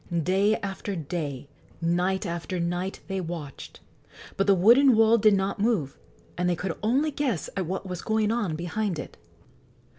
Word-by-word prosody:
Day 195 Hz, +5 st, +2 dB
after 200 Hz, 0 st, -4 dB
day, 145 Hz, -4 st, -4 dB, 0.3 s
night 180 Hz, +4 st, 0 dB
after 170 Hz, +1 st, -4 dB
night, 175 Hz, +3 st, -2 dB
they 195 Hz, -1 st, -2 dB
watched; 165 Hz, -5 st, -7 dB, 0.5 s
but 195 Hz, 0 st, 0 dB
the 200 Hz, -, +6 dB
wooden 240 Hz, +8 st, +6 dB
wall 225 Hz, +1 st, +5 dB
did 210 Hz, -1 st, +5 dB
not 195 Hz, +1 st, -1 dB
move, 200 Hz, -, 0 dB, 0.4 s
and 180 Hz, 0 st, +1 dB
they 175 Hz, -, +1 dB
could 170 Hz, +1 st, -3 dB
only 270 Hz, +8 st, +1 dB
guess 270 Hz, -, -2 dB
at 190 Hz, -4 st, -2 dB
what 190 Hz, +2 st, -3 dB
was 180 Hz, -2 st, -5 dB
going 220 Hz, -1 st, +1 dB
on 210 Hz, -9 st, -1 dB
behind 175 Hz, +3 st, -2 dB
it. -, -, -7 dB
190 Hz, 160 wpm, -26 LUFS, 175-215 Hz, 0.5 s, the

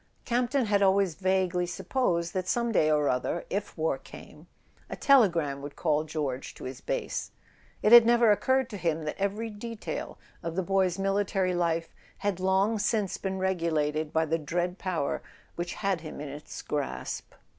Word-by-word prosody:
Campton 245 Hz, +2 st, +1 dB
had 205 Hz, -1 st, +2 dB
always 195 Hz, -2 st, +3 dB
vaguely 185 Hz, 0 st, +1 dB
supposed 175 Hz, -5 st, -1 dB
that, 185 Hz, -1 st, -2 dB
some 235 Hz, +3 st, +1 dB
day 155 Hz, -7 st, +3 dB
or 150 Hz, -1 st, +3 dB
other, 125 Hz, +7 st, -1 dB
if 200 Hz, -1 st, -3 dB
war 155 Hz, -4 st, 0 dB
came, 150 Hz, +4 st, -13 dB, 0.4 s
a -, -, -4 dB
telegram 170 Hz, -, +3 dB
would 145 Hz, 0 st, -8 dB
call 155 Hz, -2 st, +1 dB
George 145 Hz, -4 st, -4 dB
to -, -, -11 dB
his 130 Hz, 0 st, -6 dB
base; -, -, -3 dB, 0.5 s
it 210 Hz, -, +4 dB
had 240 Hz, -1 st, +11 dB
never 235 Hz, -1 st, +5 dB
occurred 260 Hz, +4 st, +2 dB
to 205 Hz, -, -5 dB
him 165 Hz, -3 st, -1 dB
that 155 Hz, -, -3 dB
every 210 Hz, +3 st, -1 dB
detail 220 Hz, +1 st, -6 dB, 0.2 s
of 165 Hz, 0 st, -4 dB
the 190 Hz, -, 0 dB
boy's 190 Hz, -1 st, +1 dB
military 195 Hz, -1 st, +1 dB
life 165 Hz, -1 st, 0 dB, 0.2 s
had 200 Hz, -2 st, -1 dB
long 190 Hz, +4 st, +2 dB
since 210 Hz, -2 st, 0 dB
been 190 Hz, -1 st, -3 dB
regulated 160 Hz, -5 st, 0 dB
by 160 Hz, 0 st, +2 dB
the 165 Hz, +1 st, 0 dB
dread 175 Hz, +4 st, -2 dB
power 175 Hz, -7 st, -1 dB, 0.3 s
which 175 Hz, +1 st, -4 dB
had 195 Hz, -5 st, -1 dB
him 155 Hz, -3 st, -8 dB
in 145 Hz, -1 st, -5 dB
its 145 Hz, +2 st, -8 dB
grasp. 135 Hz, -, -4 dB
185 Hz, 170 wpm, -28 LUFS, 155-205 Hz, 0.5 s, had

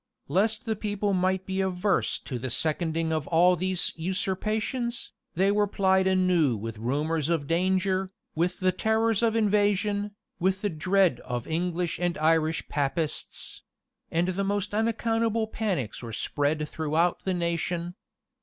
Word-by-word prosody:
[] -, -, -59 dB
Lest 215 Hz, +8 st, +1 dB
the 220 Hz, -1 st, 0 dB
people 205 Hz, -1 st, -1 dB
might 185 Hz, 0 st, +1 dB
be 190 Hz, 0 st, -1 dB
averse 190 Hz, +1 st, +1 dB
to 125 Hz, -3 st, -6 dB
the 130 Hz, +2 st, -3 dB
seconding 160 Hz, +4 st, 0 dB
of 155 Hz, -3 st, -2 dB
all 175 Hz, +2 st, +5 dB
these 185 Hz, +1 st, -1 dB
usurpations, 210 Hz, +7 st, -2 dB, 0.2 s
they 190 Hz, +3 st, +3 dB
were 205 Hz, 0 st, +2 dB
plied 190 Hz, -1 st, +2 dB
anew 180 Hz, -9 st, +3 dB
with 110 Hz, +1 st, -6 dB
rumors 150 Hz, +6 st, -1 dB
of 165 Hz, -4 st, 0 dB
danger, 185 Hz, +3 st, +1 dB, 0.2 s
with 175 Hz, +3 st, -1 dB
the 185 Hz, 0 st, +3 dB
terrors 220 Hz, +3 st, +1 dB
of 230 Hz, -1 st, +2 dB
invasion, 205 Hz, -1 st, +1 dB, 0.2 s
with 190 Hz, +2 st, 0 dB
the 205 Hz, -, 0 dB
dread 180 Hz, -2 st, +2 dB
of 120 Hz, -2 st, -4 dB
English 175 Hz, +1 st, -1 dB
and 175 Hz, -1 st, 0 dB
Irish 160 Hz, +1 st, +2 dB
Papists; 145 Hz, +2 st, -3 dB, 0.5 s
and 170 Hz, +2 st, +1 dB
the 190 Hz, +2 st, -1 dB
most 205 Hz, 0 st, -1 dB
unaccountable 225 Hz, 0 st, +1 dB
panics 195 Hz, -, -3 dB
were 115 Hz, -2 st, -7 dB
spread 150 Hz, +5 st, -1 dB
throughout 160 Hz, +3 st, 0 dB
the 190 Hz, -1 st, 0 dB
nation. 170 Hz, 0 st, -2 dB
185 Hz, 145 wpm, -27 LUFS, 160-205 Hz, 0.5 s, all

